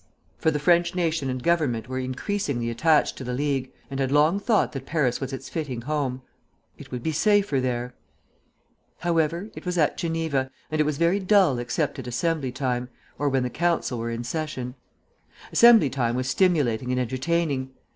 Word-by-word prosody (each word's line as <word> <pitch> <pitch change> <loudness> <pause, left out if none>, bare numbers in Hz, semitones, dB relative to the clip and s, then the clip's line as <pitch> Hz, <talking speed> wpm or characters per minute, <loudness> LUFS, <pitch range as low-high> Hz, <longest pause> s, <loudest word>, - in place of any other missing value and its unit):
For - - +3
the 155 - 0
French 175 +3 +3
nation 160 -6 0
and 130 -1 -3
government 140 -10 +1
were 130 0 -3
increasingly 130 - -2
attached 155 +6 +2
to - - -6
the 125 0 -3
League, 135 -2 -1 0.2
and 135 - -4
had 135 -1 0
long 155 +7 +4
thought 215 0 +2
that 135 -1 -7
Paris 145 -6 0
was 135 0 -3
its 135 - -6
fitting 135 -8 -4
home. 135 -3 -2 0.5
It - - -12
would 125 -1 -5
be 160 - 0
safer 200 -2 +2
there. 125 -1 -2 1.1
However, 170 +3 0
it - - -9
was 180 -1 -2
at 155 -3 +2
Geneva, 160 -5 -1 0.2
and 155 0 +1
it - - +2
was 150 -1 -1
very 170 +5 +2
dull 185 - +3
except 120 +5 -2
at 125 - -7
Assembly 135 +2 -1
time, 125 -1 -2 0.3
or 145 0 +1
when 135 -2 +1
the 125 - -3
Council 170 -7 0
were 115 +1 -3
in 115 +1 -4
session. 130 -2 -4 0.8
Assembly 230 - +7
time 120 -3 0
was 130 0 -1
stimulating 130 - +2
and 125 0 +1
entertaining. 130 +2 -1
140 Hz, 180 wpm, -25 LUFS, 125-165 Hz, 1.1 s, Assembly